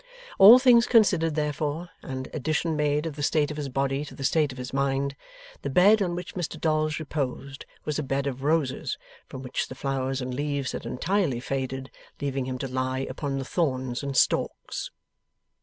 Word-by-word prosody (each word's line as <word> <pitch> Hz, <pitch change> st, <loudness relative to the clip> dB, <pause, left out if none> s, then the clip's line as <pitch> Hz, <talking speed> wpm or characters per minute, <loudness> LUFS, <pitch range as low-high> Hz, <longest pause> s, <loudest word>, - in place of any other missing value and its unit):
All 215 Hz, +6 st, +11 dB
things 245 Hz, -2 st, +5 dB
considered 180 Hz, -9 st, +4 dB
therefore, 150 Hz, +2 st, -2 dB
and 130 Hz, -1 st, -5 dB
addition 155 Hz, +2 st, -1 dB
made 150 Hz, 0 st, +1 dB
of 160 Hz, -3 st, -4 dB
the 150 Hz, -, -6 dB
state 150 Hz, 0 st, +1 dB
of 150 Hz, -, -6 dB
his 145 Hz, -2 st, -3 dB
body 135 Hz, +2 st, -1 dB
to -, -, -11 dB
the 135 Hz, -, -7 dB
state 150 Hz, +1 st, +2 dB
of 130 Hz, -, -10 dB
his 125 Hz, 0 st, -6 dB
mind, 140 Hz, 0 st, 0 dB, 0.5 s
the -, -, -3 dB
bed 200 Hz, +9 st, +5 dB
on 175 Hz, -3 st, 0 dB
which 180 Hz, 0 st, -6 dB
Mr 175 Hz, -3 st, -4 dB
Dolls 155 Hz, -1 st, +1 dB
reposed 140 Hz, -2 st, -4 dB, 0.2 s
was 150 Hz, 0 st, -1 dB
a -, -, 0 dB
bed 135 Hz, 0 st, -1 dB
of 135 Hz, -2 st, -3 dB
roses 145 Hz, -2 st, 0 dB, 0.3 s
from 130 Hz, -, -8 dB
which 125 Hz, -, -2 dB
the 130 Hz, -, -9 dB
flowers 135 Hz, -1 st, -2 dB
and 125 Hz, -1 st, -4 dB
leaves 140 Hz, -1 st, -2 dB
had -, -, -6 dB
entirely 165 Hz, -3 st, 0 dB
faded, 130 Hz, 0 st, -4 dB, 0.3 s
leaving 135 Hz, -2 st, -2 dB
him 130 Hz, 0 st, -3 dB
to 135 Hz, -, -4 dB
lie 130 Hz, +1 st, -2 dB
upon 140 Hz, 0 st, -3 dB
the 135 Hz, -, -3 dB
thorns 130 Hz, -6 st, -1 dB
and 140 Hz, -2 st, -3 dB
stalks. -, -, 0 dB
140 Hz, 190 wpm, -26 LUFS, 130-155 Hz, 0.5 s, All